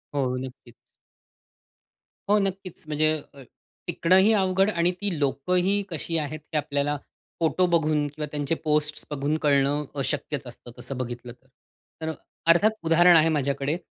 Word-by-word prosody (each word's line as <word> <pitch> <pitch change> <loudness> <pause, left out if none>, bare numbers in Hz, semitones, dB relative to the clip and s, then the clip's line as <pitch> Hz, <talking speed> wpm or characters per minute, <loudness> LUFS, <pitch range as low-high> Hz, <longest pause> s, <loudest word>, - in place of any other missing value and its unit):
हो, 130 -2 0
नक्कीच. 125 -2 -10 1.6
हो, 210 - +5
नक्कीच. 195 -3 -4
म्हणजे 155 +1 +2 0.2
अ, 140 - -13 0.5
टिकणंही 190 +5 +4
अवघड 190 0 +2
आणि 170 -2 +2
ती 200 -5 0
लोकंही 180 +8 +1
कशी 165 0 -2
आहेत, 155 0 -3
हे - - +2
आपल्याला 145 0 -1 0.4
फोटो 170 +2 +2
बघून 155 -3 +1
किंवा 150 +1 -5
त्यांचे 145 +2 -1
पोस्ट 150 0 0
बघून 145 +2 -1
कळणं 140 +1 +3 0.2
अशक्यच 145 0 -2
असतं 120 0 -11
तसं 135 - -6
बघितलं 120 -1 -5
तर. 130 +1 -29 0.5
तर 160 - -2
अ, - - -2 0.4
अर्थात 205 +6 +4
उदाहरण 170 +2 +6
आहे 160 0 +4
माझ्याकडे. 140 +1 -1
155 Hz, 140 wpm, -25 LUFS, 140-175 Hz, 1.6 s, उदाहरण